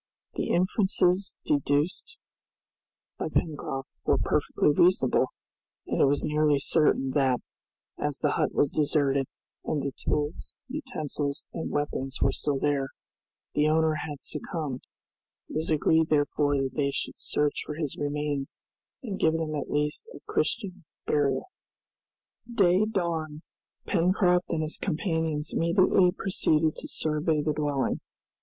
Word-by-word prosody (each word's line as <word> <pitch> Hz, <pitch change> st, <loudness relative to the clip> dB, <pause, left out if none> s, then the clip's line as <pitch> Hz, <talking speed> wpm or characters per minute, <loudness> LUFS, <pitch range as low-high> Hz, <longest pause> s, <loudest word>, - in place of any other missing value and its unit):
The -, -, -2 dB
inferences 185 Hz, 0 st, +2 dB
deduced 150 Hz, -, 0 dB, 1.0 s
by -, -, -1 dB
Pencroft 135 Hz, -4 st, -2 dB, 0.2 s
were -, -, +3 dB
perfectly -, -, +2 dB
reasonable, 170 Hz, -4 st, +4 dB, 0.6 s
and -, -, 0 dB
it -, -, +7 dB
was 140 Hz, +1 st, +2 dB
nearly 150 Hz, -1 st, +3 dB
certain 140 Hz, -2 st, +2 dB
that, 130 Hz, -3 st, +2 dB, 0.6 s
as 145 Hz, -1 st, -1 dB
the 150 Hz, -, +1 dB
hut -, -, +1 dB
was 145 Hz, -, +2 dB
deserted, 140 Hz, -3 st, +1 dB, 0.4 s
and 150 Hz, -3 st, -1 dB
the 140 Hz, -, -1 dB
tools, 150 Hz, +3 st, -3 dB
utensils, 155 Hz, -, -4 dB
and 165 Hz, -, -4 dB
weapons 135 Hz, -2 st, -2 dB
were 135 Hz, -, +3 dB
still 145 Hz, 0 st, -1 dB
there, 140 Hz, -1 st, +1 dB, 0.7 s
the 150 Hz, +1 st, +3 dB
owner 160 Hz, 0 st, +3 dB
had 145 Hz, -2 st, -6 dB
succumbed. 150 Hz, -3 st, -4 dB, 0.7 s
It -, -, -3 dB
was 160 Hz, +2 st, -1 dB
agreed, 160 Hz, +1 st, +3 dB
therefore, 145 Hz, -1 st, +2 dB
that 135 Hz, -1 st, -1 dB
they 140 Hz, 0 st, +1 dB
should 140 Hz, -, -4 dB
search 145 Hz, -1 st, 0 dB
for 150 Hz, -, -6 dB
his 150 Hz, -3 st, -3 dB
remains, 145 Hz, -1 st, -3 dB, 0.4 s
and 205 Hz, -6 st, -4 dB
give 160 Hz, -, +3 dB
them 160 Hz, -1 st, -2 dB
at 145 Hz, -, -3 dB
least 150 Hz, -, -1 dB, 0.2 s
Christian 190 Hz, -4 st, -1 dB, 0.2 s
burial. 140 Hz, -3 st, +1 dB, 1.1 s
Day 195 Hz, -3 st, +4 dB
dawned; 165 Hz, -7 st, -2 dB, 0.4 s
Pencroft 180 Hz, 0 st, +2 dB
and 160 Hz, -2 st, 0 dB
his 155 Hz, -, -3 dB
companions 160 Hz, -4 st, -1 dB
immediately 180 Hz, +1 st, +4 dB
proceeded 160 Hz, -5 st, +1 dB
to -, -, -6 dB
survey 155 Hz, 0 st, 0 dB
the 150 Hz, 0 st, +1 dB
dwelling. 145 Hz, -2 st, 0 dB
150 Hz, 130 wpm, -27 LUFS, 145-170 Hz, 1.1 s, it